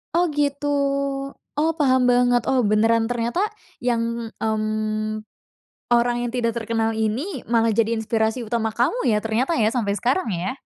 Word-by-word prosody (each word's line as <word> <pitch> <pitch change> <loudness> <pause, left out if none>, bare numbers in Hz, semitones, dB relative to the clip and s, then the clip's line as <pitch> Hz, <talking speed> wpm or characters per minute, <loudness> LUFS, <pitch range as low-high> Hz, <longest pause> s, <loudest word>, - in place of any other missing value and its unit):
Oh 350 +1 +4
gitu, 290 0 -1 0.9
oh 320 +2 +3
paham 260 -3 +4
banget. 245 -1 +4
Oh 260 -1 +3
beneran, 225 +2 +3
ternyata 240 +9 -1 0.4
yang 235 -1 -1
mmm, 215 0 -1 0.7
orang 240 0 +3
yang - - -3
tidak 230 -2 0
terkenal 225 0 -1
ini 235 - -2
malah 230 -1 +3
jadi 230 +1 +2
inspirasi 220 +2 0
utama 225 0 -1
kamu 285 - +1
ya, 215 - +3
ternyata 245 +9 0
ya, 220 0 +2
sampai 205 -5 0
sekarang 250 - 0
ya? 180 +6 -2
230 Hz, 145 wpm, -22 LUFS, 220-250 Hz, 0.9 s, Oh